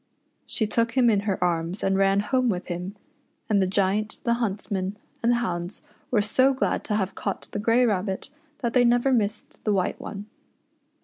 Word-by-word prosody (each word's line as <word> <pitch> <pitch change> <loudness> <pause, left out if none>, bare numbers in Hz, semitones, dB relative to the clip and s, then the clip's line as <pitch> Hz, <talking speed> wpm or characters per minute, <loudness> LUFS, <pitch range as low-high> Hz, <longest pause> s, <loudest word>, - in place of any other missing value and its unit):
She 220 - +2
took 230 +2 0
him 240 -2 +5
in 205 - +3
her 190 -2 0
arms 170 +2 -1
and 195 0 +2
ran 195 +1 +3
home 255 +3 +1
with 185 -3 -3
him, 180 +3 -4 0.5
and 205 -3 +3
the 190 - +2
Giant, 200 +3 0
the 235 - +2
huntsmen, 200 -2 -2 0.2
and 235 - +3
the - - +4
hounds 180 -6 -3 0.3
were 215 -4 +2
so 260 +6 +3
glad 260 - 0
to 210 - 0
have 195 -2 -1
caught 200 - -4
the - - -3
grey 230 +4 +3
rabbit 195 +2 -1 0.3
that 235 - 0
they 250 - +5
never 245 +2 +3
missed 210 -2 -1
the 215 - +1
white 185 -2 0
one. 200 0 -7
210 Hz, 190 wpm, -25 LUFS, 190-235 Hz, 0.5 s, him